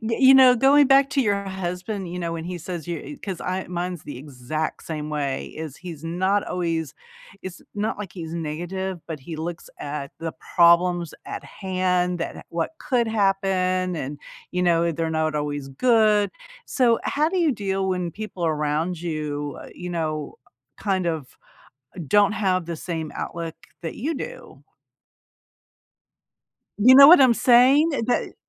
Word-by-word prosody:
you 260 +4 +5
know, 260 -2 +8
going 280 +3 +5
back 275 0 +5
to 275 - +1
your 200 -3 0
husband, 190 0 -4
you 180 - -4
know, 170 -1 -3
when 165 -1 -5
he 180 0 -5
says 175 -1 -6
you 175 - -5
'cause 190 -4 -5
I 185 +1 -3
mine's 180 -1 -4
the 145 - -8
exact 145 +3 -4
same 150 -2 -5
way, 140 -3 -2
is 155 -3 -8
he's 165 -4 -9
not 185 +4 0
always 165 -5 -2 0.5
it's 185 -1 -8
not 210 +1 -2
like 205 -4 -7
he's 165 -2 -7
negative, 175 +4 -4
but 160 -4 -6
he 160 +4 -7
looks 165 +2 -6
at 145 -1 -5
the 165 -1 -4 0.2
problems 170 -1 +4
at - - -7
hand, 180 -2 -1
that 165 - -5
what 165 -1 -2
could 245 -5 0
happen, 190 -3 +1
and, 145 0 -5 0.3
you 180 0 -1
know, 170 -1 +3
they're 165 +1 -2
not 155 -1 0
always 145 -2 -3
good. 215 - +3 0.4
So 240 -3 +2
how 300 +2 +1
do 375 - 0
you 320 -5 +3
deal 195 -3 -2
when 180 -2 -1
people 210 -4 -6
around 155 +2 -1
you, 150 -4 -4 0.2
you 180 0 -7
know, 155 -3 -3 0.4
kind 190 -3 -1
of 160 -6 -4 0.7
don't 205 +6 +4
have 185 -4 0
the 170 -1 -4
same 160 -2 -4
outlook 165 -1 -5 0.3
that 165 - -5
you 305 +8 -2
do? - - -8 2.2
You 250 +5 +7
know 275 +1 +11
what 315 -1 +9
I'm 250 -3 +6
saying? 260 +8 +5 0.2
That 245 - -1
180 Hz, 160 wpm, -23 LUFS, 160-205 Hz, 2.2 s, know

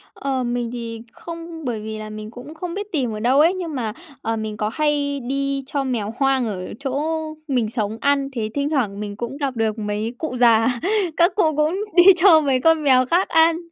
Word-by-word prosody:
Ờ, 265 -2 -2
mình 240 -1 -2
thì 230 -2 -6
không, 335 -2 -9
bởi 230 -3 -2
vì 220 0 -6
là 215 0 -7
mình 215 +1 -8
cũng 250 +6 -10
không 340 +1 -5
biết 410 +1 -5
tìm 260 -8 -1
ở 215 - -5
đâu 255 +6 +3
ấy. 335 +4 +5
Nhưng 345 -5 -5
mà, 225 -5 -2 0.3
ờ, 225 0 -1
mình 215 -1 -4
có 210 - -1
hay 290 -2 0
đi 275 +2 -2
cho 280 -1 -1
mèo 230 -5 -2
hoang 270 -2 +2
ở 185 -4 -5
chỗ 275 +1 -2 0.5
mình 245 -6 0
sống 220 -1 -3
ăn, 280 -1 +1
thế 220 -3 -2
thỉnh 285 0 -1
thoảng 220 -10 -1
mình 205 -1 -5
cũng 240 +5 -5
gặp 275 -4 -2
được 220 -1 -1
mấy 210 +2 -3
cụ 310 -4 -4
già. 235 0 +4 0.4
Các 345 +3 +4
cụ 320 -7 +2
cũng 305 +3 +2 0.2
đi 350 - +8
cho 335 -3 +6
mấy 270 -3 +1
con 325 -2 +3
mèo 255 -2 +5
khác 350 +8 +2
ăn. 325 0 +4
265 Hz, 220 wpm, -21 LUFS, 225-305 Hz, 0.5 s, đi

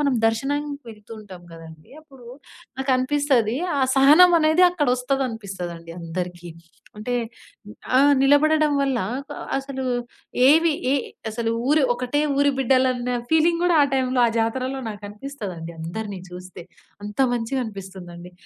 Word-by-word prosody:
మనం 280 -3 +1
దర్శనానికి 285 +4 -2
వెళ్తూ 215 +1 -14
ఉంటాం 190 -4 -12
కదండీ! 160 -1 -13
అప్పుడు 270 -6 -17 0.5
నాకనిపిస్తది, 260 -3 +1 0.2
ఆ - - +1 0.2
సహనమనేది 315 +4 +6
అక్కడొస్తదనిపిస్తది 230 - -3
అందరికి. 175 +1 -6 0.5
అంటే 230 +4 -4 0.8
ఆ - - +6 0.2
నిలబడడం 305 +2 +3
వల్ల, 270 -2 0 0.2
నాకు 280 +3 -6 0.2
అసలు 270 -1 -5 0.7
ఏవి 325 +3 +5 0.2
ఎ - - +3 0.4
అసలు 225 +1 -2 0.2
ఊరు 300 +1 +4
ఒకటే 250 +4 -2 0.2
ఊరు 285 0 +4
బిడ్డలన్న 255 -1 +1 0.2
ఫీలింగ్ 330 +2 +3
గూడా 355 -1 +3
ఆ - - +5
టైంలో, 260 -1 0
ఆ - - +2
జాతరలో 255 +4 -1
నాకనిపిస్తదండి. 205 -4 -7
అందరిని 195 +4 -5
చూస్తే. 180 0 -10 0.4
అంత 210 0 -8
మంచిగా 245 +2 -2
అనిపిస్తుందండి. 185 -4 -10
255 Hz, 115 wpm, -22 LUFS, 205-285 Hz, 0.8 s, సహనమనేది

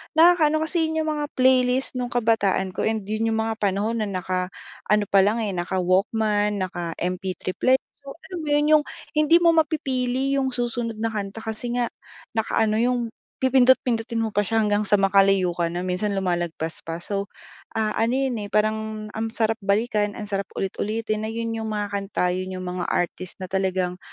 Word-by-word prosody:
nakakaano, 320 -2 +5
kasi 320 +1 0
yun 320 0 -1
yung 310 -1 -1
mga 295 - -2
playlist 255 0 +3
nung 250 - -1
kabataan 220 -6 +1
ko - - -1
and 220 -1 -1
yun 215 +3 -1
yung 220 0 +1
mga 225 0 -3
panahon 205 +3 0
na 215 - -1
naka-ano 185 +2 -2
palang 205 +4 +4
eh, 205 - -1
naka 180 +1 -2
Walkman, 205 +2 +1
naka 175 -3 -4
MP3 185 +1 -3
player. 260 +1 +3 0.2
So 275 -1 -10 0.2
alam 360 - -4
mo 310 - -6
yun, 295 0 +3
yung - - -4 0.3
hindi 305 +2 +5
mo 335 - +7
mapipili 270 -4 +1
yung 265 -1 0
susunod 240 -1 -2
na 225 +1 -1
kanta 210 0 -5
kasi 220 +2 -4
nga 240 -2 0 0.4
naka-ano, 220 -1 +1
yung 245 +1 +2 0.4
pipindot-pindutin 250 -3 +3
mo 220 - -2
pa - - +3
siya 225 +2 0
hanggang 205 0 +1
sa 205 - +5
makalayo 195 -2 +4
ka 170 -1 0
na, 175 +2 -3
minsan 185 +3 -1
lumalagpas 175 -4 -2
pa. 165 +1 -5
So 200 0 -3 0.5
ah, 220 -1 +1
ano 230 +3 +2
yun 265 -4 0
eh 205 - -5
parang 215 0 -1
ang 220 +1 -3
sarap 225 0 +1
balikan, 205 +1 +1
ang 215 - -5
sarap 195 -1 -1
ulit-ulitin, 215 +2 -2
na - - -3
yun 230 0 -3
yung 225 -1 -3
mga 210 -1 -2
kanta, 195 -3 -1
yun 185 +1 -3
yung 185 0 -5
mga 180 0 -3
artist 175 +1 -2
na - - -2
talagang 185 -1 0
215 Hz, 185 wpm, -24 LUFS, 195-245 Hz, 0.5 s, mo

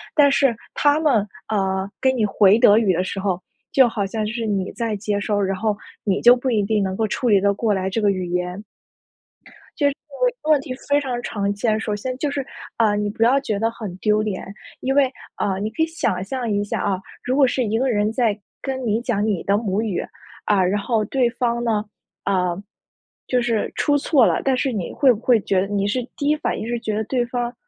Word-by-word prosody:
但 290 -2 +6
是 275 -4 +3 0.2
他 290 +1 +3
们， 255 -10 +2 0.2
呃， 190 -2 0
给 260 - +4
你 235 -5 +1
回 205 +1 +4
德 210 -2 +6
语 205 -5 +2
的 180 +2 0
时 195 - -4
候， 190 -2 -1 0.3
就 260 -3 +6
好 215 -3 -2
像 215 +1 -2
就 215 - -3
是 230 -2 -3
你 195 -2 -1
在 230 -3 -2
接 205 0 -2
收， 205 0 -1
然 195 -1 0
后 210 +1 -1 0.3
你 195 -4 +1
就 245 +1 +7
不 255 +1 -2
一 215 -4 +2
定 210 -1 +1
能 190 0 -2
够 220 -1 +1
处 240 +3 -1
理 200 -2 +5
得 200 +1 +2
过 220 +1 0
来 190 0 -1
这 225 - -1
个 205 - +3
语 185 -2 -1
言。 180 +3 -3 1.1
就 285 - +3
是 280 - 0 0.5
问 310 - +2
问 280 - +2
题 255 - -6 0.2
非 285 0 +4
常 250 -4 -3
常 200 -3 -2
见。 215 +1 0
首 210 -2 -2
先 255 +4 -4
就 285 0 -1
是， 275 -2 -3 0.3
啊， 215 -3 +3
你 205 0 -1
不 230 +2 0
要 265 +4 +4
觉 215 -7 -2
得 225 +1 +1
很 210 -6 -7
丢 215 +1 +2
脸， 210 -3 -3 0.4
因 270 +1 0
为 275 -2 +4 0.2
啊， 190 -1 -1
你 210 +2 -2
可 320 +8 -1
以 - - +3
想 195 - -1
象 245 +2 -3
一 205 0 +1
下 205 - -3
啊， 195 -2 0 0.2
如 255 +1 0
果 275 -2 +5
是 255 0 0
一 220 0 0
个 260 +1 +1
人 210 -1 +1
在 225 -3 0 0.2
跟 260 -2 -3
你 215 +2 +1
讲 215 -4 0
你 205 -6 -1
的 200 - +2
母 210 -1 -1
语， 210 -5 -2 0.4
啊， 200 -3 +3
然 200 +2 0
后 220 -1 0
对 250 +1 +1
方 235 0 -1
呢， 215 -3 0 0.4
啊 180 -3 0 0.7
就 250 - +2
是 230 -3 -1
出 290 - +2
错 280 -3 +3
了。 - - +1
但 265 -2 +2
是 270 -1 0
你 200 -6 -3
会 265 -3 +4
不 210 - -7
会 235 -1 +3
觉 190 -2 +1
得 195 - -2
你 200 -1 -1
是 250 +4 0 0.2
第 285 - -2
一 300 - +4
反 305 - -2
应， 220 - -5
是 240 0 -2
觉 215 -2 -3
得 220 - -1
对 245 +2 0
方， 240 -1 -3
220 Hz, 255 characters per minute, -21 LUFS, 200-250 Hz, 1.1 s, 就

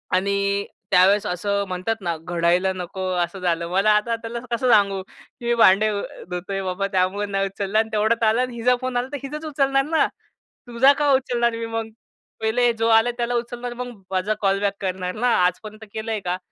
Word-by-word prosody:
आणि 200 +1 0 0.3
त्यावेळेस 195 +3 +5
असं 200 +3 -1
म्हणतात 185 +5 -2
ना, 170 -2 -2
घडायला 175 +3 +1
नको 185 +1 -6 0.2
असं 175 +3 -6
झालं. 170 -2 -1
मला 195 +4 +3
आता 230 +2 +1
त्याला 235 +1 -5
कसं 245 +2 +1
सांगू, 200 -3 +4
की 235 - -16
मी 240 - +2
भांडे 215 -1 +5
धू 200 - -2 0.3
धुतोय 195 +2 -4
बाबा, 190 +2 -2
त्यामुळे 190 +2 +1
नाही 195 0 0
उचलला. 195 +2 -1
आणि 220 0 0
तेवढ्यात 220 +2 +1
आलं 220 +3 +3
आणि 250 -1 -3
हिचा 250 +2 +2
फोन 255 -1 -2
आला, 245 +1 -1
तर 285 - -3
हीचाच 300 +3 -6
उचलणार 275 -2 +1
ना, 320 +1 +2 0.6
तुझा 250 +4 +5
का 290 -1 +3
उचलणार 240 -3 +1
मी 230 0 -4
मग? 225 0 -4 0.5
पहिले 240 +2 +2
जो 225 - +2
आला 225 +2 +4
त्याला 240 0 -1
उचलणार, 240 +1 -4
मग 245 0 -6 0.2
माझा 190 +3 0
कॉल 195 0 +2
बॅक 200 -1 +1
करणार 185 -1 -3
ना, 245 +3 0 0.2
आजपर्यंत 215 +5 -3
केलंय 220 0 -3
का? 180 +1 -1
215 Hz, 195 wpm, -22 LUFS, 190-235 Hz, 0.6 s, त्यावेळेस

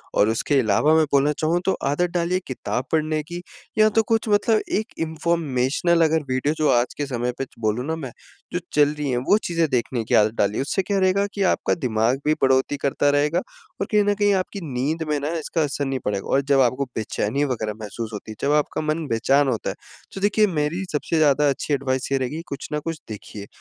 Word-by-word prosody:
और 105 - +4
उसके 135 +5 +1
अलावा 120 +7 +3
मैं 160 - +5
बोलना 140 +1 +4
चाहूँ 165 +3 +1
तो 190 - +3 0.2
आदत 175 +5 +1
डालिए 175 +1 +1
किताब 130 0 -3
पढ़ने 155 -1 +1
की 175 +3 -7 0.4
या 215 0 +6
तो 225 +1 +2
कुछ 225 0 +1
मतलब 210 +1 +3 0.2
एक 235 +4 -7
इन्फ़ॉर्मेशनल 160 -1 +1
अगर 160 -1 +1
वीडियो 130 +4 +1
जो 155 -1 +2
आज 120 0 +2
के 145 - -1
समय 125 -1 -2
पे 135 - -2
च 130 - -27
बोलूँ 110 +4 0
ना 160 +1 -1
मैं, 135 -6 -6 0.4
जो 175 - 0
चल 145 -1 +5
रही 150 -2 -3
हैं, 120 - 0
वो 165 +12 +3
चीज़ें 170 -2 +1
देखने 120 -2 -1
की - - +1
आदत 105 +1 +4
डालिए। 105 +5 +1
उससे 170 +7 0
क्या 200 0 0
रहेगा 190 +2 +2
कि 200 - -1
आपका - - -1
दिमाग 125 -3 0
भी 155 - +4
बढ़ोत्तरी 130 +2 +3
करता 140 +1 +1
रहेगा 145 +4 +2 0.4
और 195 - 0
कहीं 210 -1 +4
न 205 - +3
कहीं 205 0 +3
आपकी 190 +1 -2
नींद 150 +6 -1
में 150 -1 +1
ना 145 +2 -3
इसका 160 +1 -2
असर 145 -1 -2
नहीं 135 -1 -2
पड़ेगा 100 -1 -2
और 135 - +4
जब 135 - +5
आपको 130 +3 +1
बेचैनी 110 +5 -1
वगैरह 110 -5 -2
महसूस 110 +2 -6
होती 105 +1 -7
है, - - -8
जब - - +2
आपका 150 - -1
मन 155 +1 -1
बेचैन 135 +5 +2
होता - - -1
है, - - -4 0.4
तो 195 - -6
देखिए 210 +1 +3
मेरी 165 +2 -1
सबसे 160 +2 -1
ज़्यादा 145 -1 +4
अच्छी 140 +2 -2
एडवाइस 130 -2 -1
ये 135 - +3
रहेगी, 135 +5 -3
कुछ 140 0 -6
ना 150 - 0
कुछ 165 +1 -5
देखिए। 105 -1 -8
145 Hz, 225 wpm, -23 LUFS, 130-170 Hz, 0.4 s, या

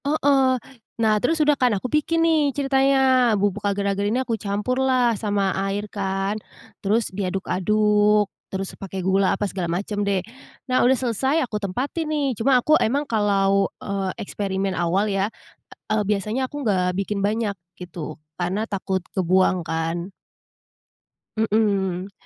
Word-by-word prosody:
Heeh. 280 -2 +3 0.5
Nah, 215 -1 +4
terus 325 +6 +1
udah 295 0 +5
kan 250 -3 +3
aku 250 +6 -4
bikin 315 +3 +1
nih 325 -1 +4 0.2
ceritanya, 265 -3 +3
bubuk 205 +1 -1
agar-agar 200 0 0
ini 230 +5 +1
aku 255 -3 -2
campurlah, 245 +3 +1
sama 205 -2 0 0.2
air 200 +1 -2
kan. 195 +1 -2 0.4
Terus 215 +3 +1
diaduk-aduk, 210 +2 +2 0.2
terus 195 0 -3
pakai 195 -1 -6
gula 190 0 +3
apa 205 - -1
segala 180 -3 -3
macam 205 0 -4
deh. 195 -2 +1 0.5
Nah 255 -1 +3
udah 260 +1 +4
selesai, 265 +6 0
aku 215 -3 -4
tempatin 255 - -2
nih. 300 -2 0
Cuma, 260 +3 +4
aku 305 +5 +4
emang 280 +6 +1
kalau, 195 -2 +2
eee, 195 -1 -2
eksperimen 195 -1 -2
awal 175 +4 +1
ya, 195 +1 0 0.6
eee, 215 -1 +2
biasanya 210 +5 -1
aku 290 - -6
nggak 180 -4 +1
bikin 200 +1 -2
banyak, 210 -1 -1 0.2
gitu. 165 -3 -7 0.2
Karena 185 +5 -1
takut 190 -1 -2 0.2
kebuang 185 0 +3
kan. 165 +3 -3 1.3
Mhm. 200 -4 0
205 Hz, 140 wpm, -23 LUFS, 195-250 Hz, 1.3 s, udah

